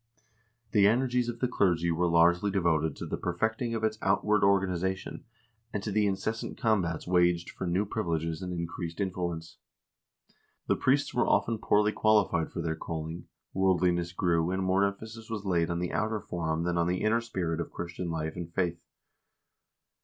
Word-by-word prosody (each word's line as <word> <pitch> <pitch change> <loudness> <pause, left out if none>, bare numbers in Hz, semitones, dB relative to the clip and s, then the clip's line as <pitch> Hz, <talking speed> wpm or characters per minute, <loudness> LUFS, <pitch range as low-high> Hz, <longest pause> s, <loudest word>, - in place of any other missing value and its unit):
The 100 -3 +5
energies 125 +1 +2
of 120 0 -6
the 125 - +2
clergy 85 -8 +1
were 85 +2 +1
largely 85 +4 +4
devoted 80 -6 +1
to - - -6
the - - -4
perfecting 110 +6 -1
of 110 - -3
its 110 -1 0
outward 105 +2 +2
organization, 95 -1 0 0.5
and 105 - -3
to 105 - -3
the 105 0 +2
incessant 110 +3 -3
combats 95 -8 0
waged 90 -1 +2
for 95 - -5
new 90 +4 +1
privileges 85 -6 -2
and 90 -1 -4
increased 85 0 -5
influence. 85 -4 -3 1.1
The - - +2
priests 140 +2 +1
were 125 - +2
often 115 -2 +2
poorly 105 0 +3
qualified 105 -7 +2
for 85 - -4
their 80 -1 -1
calling, 80 +1 -5 0.3
worldliness 90 -2 +2
grew, 85 -2 +1
and 95 +1 -1
more 95 +1 +3
emphasis 110 +3 -6
was 105 -3 -4
laid 85 -3 +1
on 85 - -1
the 90 0 -3
outer 110 0 0
form 80 -3 -2
than 85 0 0
on 85 - +2
the 90 +1 -1
inner 110 +2 +3
spirit 90 -8 -2
of - - -5
Christian 85 0 -5
life 80 -1 -3
and 85 -2 -6
faith. 85 -1 -1
90 Hz, 170 wpm, -29 LUFS, 85-105 Hz, 1.1 s, The